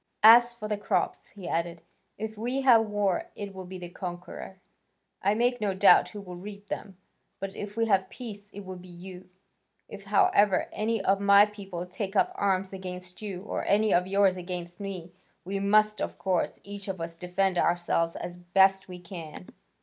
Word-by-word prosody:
As 240 +2 +9
for 235 -3 -7
the 210 -1 -2
crops," - - -1
he 190 -4 -8
added, 170 0 -2 0.3
"if 220 0 -5
we 245 +5 -2
have 235 -4 +6
war, 205 -3 0
it 200 -1 -6
will 190 -1 -8
be 185 +1 -7
the 180 -1 -7
conqueror, 180 +2 -8 0.6
I 200 +2 +2
make 245 +1 +1
no 200 -2 0
doubt, 190 +1 +6
who 205 - -8
will 180 -2 -9
reap 200 +2 -10
them, 195 -3 -6 0.4
but 195 0 -5
if 205 +1 -7
we 230 - +2
have 190 -3 +2
peace, 205 -4 -9
it 205 - -8
will 185 0 -7
be 180 +1 -13
you. 180 +1 -11 0.6
If, 200 -1 -10
however, 200 -1 +3
any 220 -1 -1
of 195 +1 +3
my 200 0 +7
people 195 -4 -7
take 195 +2 -5
up - - +3
arms 195 -1 0
against 180 0 -7
you, 195 -3 -5
or - - -3
any 210 +1 +3
of 180 +1 +3
yours 195 -1 +3
against 175 -1 -6
me, 190 -4 -6 0.3
we 195 +2 -2
must, 215 +1 +3
of - - -3
course, 185 -3 -1
each 200 0 -8
of 190 -2 -4
us, 165 0 -5
defend 180 +1 0
ourselves 170 -1 +1
as 175 0 -6
best 190 +2 +3
we 180 -1 -9
can." 165 - -9
195 Hz, 190 wpm, -28 LUFS, 180-205 Hz, 0.6 s, As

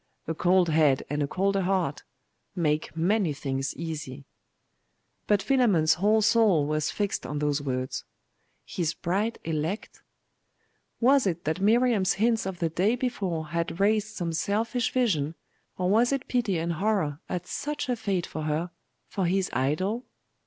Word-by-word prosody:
A 160 - -1
cold 180 +1 +3
head 150 -4 +3
and 150 0 -1
a 145 - +1
colder 195 +4 0
heart 180 -6 0 0.5
make 155 -2 -1
many 180 -1 +2
things 135 -1 -3
easy. 150 -4 -6 1.0
But 205 -2 +3
Philammon's 210 -11 +3
whole 210 +6 +2
soul 215 -8 +4
was 155 0 0
fixed 205 -2 -2
on 150 - -4
those 145 0 0
words. 130 -2 -3 0.6
'His 170 -3 -2
bride 205 +7 -1
elect!'.... 165 +5 -3 1.0
Was 260 -1 +4
it 170 -2 -2
that 160 +5 -2
Miriam's 220 -2 +3
hints 225 0 +1
of 190 -2 -4
the 170 -1 0
day 190 +8 +1
before 190 -11 -2
had 170 +1 -2
raised 215 +1 +1
some 170 -3 -2
selfish 225 +7 0
vision, 165 - +1 0.4
or 180 - 0
was 225 +6 +3
it 275 -2 -2
pity 225 -8 0
and 170 +1 -1
horror 175 -5 0
at 180 -1 -3
such 295 +7 -4
a 250 - +1
fate 195 -6 -1
for 155 - -6
her 155 +3 -1 0.4
for 190 -3 -1
his 190 +1 0
idol? 185 - -1
180 Hz, 150 wpm, -27 LUFS, 155-215 Hz, 1.0 s, soul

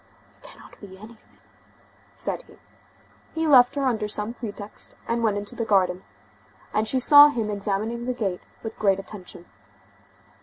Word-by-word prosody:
"It - - -29
cannot - - -16
be 190 -2 -12
anything," 215 +3 -16 0.8
said - - -1
he. - - -18 0.8
He 325 0 -1
left 255 -4 +6
her 280 -1 -1
under 225 -5 0
some 210 +2 -3
pretext, 210 -3 -8
and 235 0 -1
went 215 -3 +1
into 205 +4 -4
the 235 - -2
garden, 190 -4 +1 0.7
and 215 +1 +1
she 260 +4 +1
saw 290 +3 +9
him 230 -7 -2
examining 215 +4 -3
the 250 - 0
gate 195 -7 -3 0.2
with 225 - -7
great 195 -3 +3
attention. 195 -3 -9
215 Hz, 155 wpm, -24 LUFS, 200-240 Hz, 0.8 s, saw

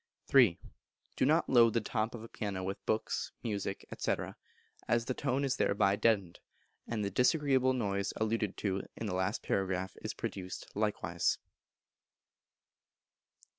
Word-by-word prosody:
iii. 120 -11 +7 0.6
Do - - +2
not - - +3
load 115 -3 +6
the 115 - +3
top 110 +1 -2
of 110 - -8
a - - -8
piano 100 -4 -4
with 95 +1 -4
books, 110 - -1
music, 100 -3 -3
&c., - - +1 0.7
as 120 0 +2
the 130 - -1
tone 135 +1 0
is 135 - 0
thereby 100 -1 +3
deadened, 100 -4 +1 0.5
and 110 -3 -1
the 100 - -2
disagreeable 130 - +3
noise 100 -5 -1
alluded 110 -2 -1
to 95 -2 -1
in 115 - -5
the 100 - -2
last 95 0 -1
paragraph 95 -1 -1
is - - -3
often - - -34
produced 95 -1 -6
likewise. 105 0 0
105 Hz, 145 wpm, -33 LUFS, 100-120 Hz, 0.7 s, iii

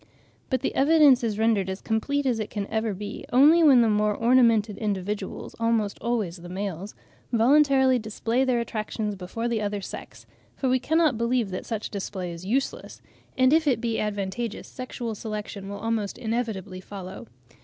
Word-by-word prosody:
But 260 -2 0
the - - -1
evidence 285 -3 +5
is 215 -3 -1
rendered 220 -4 +2
as 190 +1 -4
complete 280 +6 -1
as 245 -4 +1
it 215 - -3
can 205 -2 -3
ever 220 0 0
be, 205 +2 -7
only 295 +7 +6
when 270 -6 +7
the 230 - +4
more 210 -1 +2
ornamented 230 -4 +3
individuals, 200 -1 -4
almost 230 -3 0
always 215 -6 -1
the 175 +1 -11
males, 195 +1 -5 0.4
voluntarily 265 +1 +4
display 225 +3 -1
their 255 -2 +1
attractions 215 -2 -3
before 195 +5 -4
the 230 -2 -1
other 205 0 -2
sex; 195 - -9 0.3
for 265 - -1
we 255 0 +3
cannot 310 -2 +2
believe 235 -3 0
that 185 - -5
such 220 -2 -4
display 190 -3 -4
is 170 +1 -9
useless, 255 +8 -2 0.4
and 260 +2 +4
if 320 -1 +3
it 250 -5 +3
be 230 -1 -1
advantageous, 210 +2 -3
sexual 245 -3 -6
selection 210 -2 -6
will 200 - -5
almost 220 -1 -2
inevitably 220 -6 -3
follow. 190 -1 -9
225 Hz, 170 wpm, -25 LUFS, 205-250 Hz, 0.4 s, when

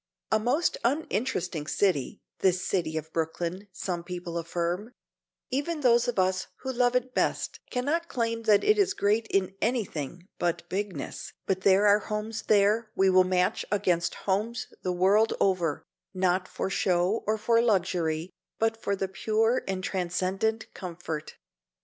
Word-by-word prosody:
A 220 - +4
most 255 +10 +1
uninteresting 205 - -1
city, 175 -11 0 0.2
this 180 -1 +2
city 160 -4 -1
of 155 +1 -6
Brooklyn, 170 +4 -2
some 180 -2 -4
people 175 -1 -6
affirm; 175 +7 -3 0.6
even 295 +4 -1
those 240 -2 +4
of 245 - -2
us 185 0 +1
who 265 - -3
love 245 0 +2
it 250 0 0
best - - 0
cannot 295 +7 -1
claim 230 -4 -1
that 210 -2 +5
it 425 0 +4
is 395 0 +3
great 215 - +1
in 190 -2 0
anything 180 - -2
but 175 -1 -1
"bigness" 190 -6 -4
but 190 -1 0
there 195 +2 +5
are 205 0 +6
homes 215 +2 -4
there 215 +2 +3
we 190 0 +4
will 185 0 +6
match 185 0 +1
against 175 -5 +1
homes 210 +5 -1
the 185 - -1
world 195 +5 +3
over, 175 -6 +1 0.3
not 185 0 +1
for - - -3
show 185 +4 +1
or 215 +1 +2
for 230 +2 +3
luxury, 175 -6 0 0.3
but 225 0 +1
for 200 -3 -2
pure 220 +5 +1
and 190 -1 -2
transcendent 190 +4 -1
comfort. 170 -4 -6
195 Hz, 150 wpm, -28 LUFS, 180-225 Hz, 0.6 s, are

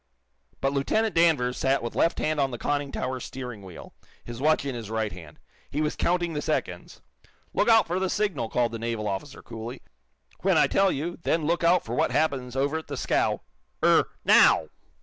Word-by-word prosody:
But 135 0 +1
Lieutenant 215 +11 +1
Danvers 150 -7 +3
sat 135 -2 +1
with 120 - -5
left 170 - +2
hand 155 -1 -1
on 135 -1 +2
the 120 - -5
conning 145 +2 -2
tower 130 0 -3
steering 125 -4 -7
wheel, 95 -3 -11 0.3
his 120 +1 -8
watch 155 -1 +2
in 135 - -2
his 115 -3 -7
right 110 -1 -1
hand. 85 -5 -11 0.3
He 145 - -3
was 150 0 0
counting 175 -1 0
the 150 - -2
seconds. - - -3 0.5
"Look - - +2
out 225 -1 +6
for 175 +3 -2
the 190 0 0
signal," 200 - -1
called 120 -2 +1
the 115 - -5
naval 115 -2 -3
officer, 95 -1 -5
coolly. 115 +2 -8 0.6
"When - - +2
I - - +6
tell 195 -1 +2
you, 165 +5 -4
then 165 -1 0
look 170 +2 0
out 170 +1 +4
for 115 - -5
what - - +1
happens 135 -5 -1
over 140 +4 0
at 160 - -13
the 140 - -5
scow. - - 0 0.4
Er - - +4 0.2
now!" - - +5
135 Hz, 200 wpm, -26 LUFS, 120-165 Hz, 0.6 s, out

